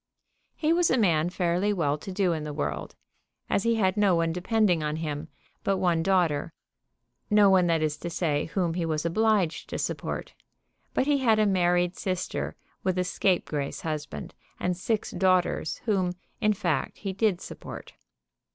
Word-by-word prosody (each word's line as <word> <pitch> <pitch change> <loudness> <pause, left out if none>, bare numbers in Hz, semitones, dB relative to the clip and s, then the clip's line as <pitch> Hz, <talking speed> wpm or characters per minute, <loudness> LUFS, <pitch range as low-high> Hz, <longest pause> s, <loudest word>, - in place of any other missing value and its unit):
He 315 +1 +2
was 345 0 +3
a - - +3
man 170 -7 +3
fairly 180 +2 +1
well 160 -8 +1
to 155 +6 -8
do 185 -2 +1
in 155 -2 -3
the 150 -1 -5
world, 75 +1 -3 0.6
as - - +3
he 230 +1 +2
had 190 -4 +2
no 200 -3 +4
one 165 -1 +1
depending 180 -1 +2
on 150 0 -1
him 155 -1 -4 0.4
but 195 -1 +1
one 175 -3 +2
daughter, 165 -4 +1 0.8
no 210 -2 +6
one, 185 -2 +5
that 165 -2 +2
is 155 -1 0
to 175 - -5
say, 155 -4 0
whom 170 -1 -1
he 175 0 -1
was 155 -1 -1
obliged 195 -1 +1
to - - -3
support. - - -3 0.6
But - - +2
he 290 -1 +2
had 230 -4 +3
a 215 - +4
married 180 -2 +2
sister 185 -2 -3 0.3
with 185 -1 0
a 180 - +2
scapegrace 175 -6 -1
husband 150 - -5 0.3
and 180 0 0
six 210 +4 -1
daughters 185 -3 +1
whom, 190 -5 +1 0.3
in 215 -2 +3
fact, 175 -7 -1
he 195 -2 -4
did 195 -2 +1
support. - - -9
180 Hz, 170 wpm, -27 LUFS, 165-200 Hz, 0.8 s, no